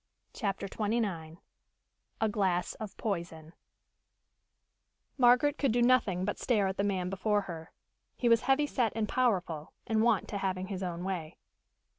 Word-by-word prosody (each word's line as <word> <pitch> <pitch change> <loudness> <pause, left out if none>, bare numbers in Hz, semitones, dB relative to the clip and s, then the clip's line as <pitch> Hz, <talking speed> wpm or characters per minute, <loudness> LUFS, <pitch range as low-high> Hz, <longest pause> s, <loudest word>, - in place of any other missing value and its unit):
CHAPTER 200 -3 -2
XXIX 200 -7 -2 0.8
A 220 - +2
GLASS 190 -4 0
OF 210 -3 -7
POISON 170 -5 -4 1.6
Margaret 260 +3 +4
could 275 -4 +2
do 240 +1 +2
nothing 215 -8 +3
but 205 - -3
stare 215 -5 +2
at 190 0 -2
the 200 - +1
man 190 -3 -1
before 205 +2 +1
her. 165 -4 -8 0.5
He 245 - 0
was 230 -1 +5
heavy 270 +3 +3
set 245 -6 0
and 220 -2 0
powerful, 185 -12 0
and 220 -1 +1
wont 225 -3 +2
to 200 - -3
having 185 -1 -2
his 195 -2 -4
own 175 -2 -4
way. 180 -4 -4
200 Hz, 150 wpm, -31 LUFS, 180-230 Hz, 1.6 s, was